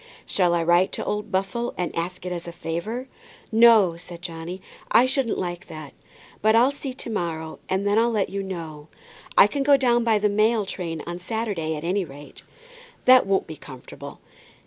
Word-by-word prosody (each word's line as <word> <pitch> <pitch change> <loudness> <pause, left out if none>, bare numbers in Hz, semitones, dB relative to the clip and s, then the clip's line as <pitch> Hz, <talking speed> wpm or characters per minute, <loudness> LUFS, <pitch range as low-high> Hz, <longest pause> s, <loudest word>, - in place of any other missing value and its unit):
"Shall 175 -3 +2
I 170 - +1
write 175 +2 +3
to - - -4
old 210 0 -3
Buffle, 195 +6 -2
and 175 -3 -3
ask 180 +2 -4
it 180 - -3
as 175 -1 -5
a - - -5
favour?" 190 +10 -4 0.4
"No," 220 -6 +6
said 170 0 -11
Johnny; 170 +1 -6 0.3
"I 245 - +6
shouldn't 260 -3 0
like 175 0 -4
that. 155 -3 -9 0.5
But 220 +1 +4
I'll 245 +4 +5
see 280 -1 -6
to 250 - -6
morrow, 160 -5 -4
and 190 +1 0
then 205 +2 +3
I'll 235 +1 +3
let 210 -5 -1
you 200 0 -2
know. 165 -6 -7 0.5
I - - +9
can 275 +7 -2
go 280 0 +5
down 240 -3 +2
by 225 -2 +3
the 210 0 +2
mail 215 +1 +2
train 165 -5 -5
on 175 +1 -5
Saturday, 195 -6 -3
at 150 - -6
any 185 +3 0
rate." 145 -2 -12 0.6
"That 255 -3 +7
won't 195 0 +1
be 160 -1 -9
comfortable. 130 - -11
190 Hz, 190 wpm, -24 LUFS, 170-225 Hz, 0.6 s, I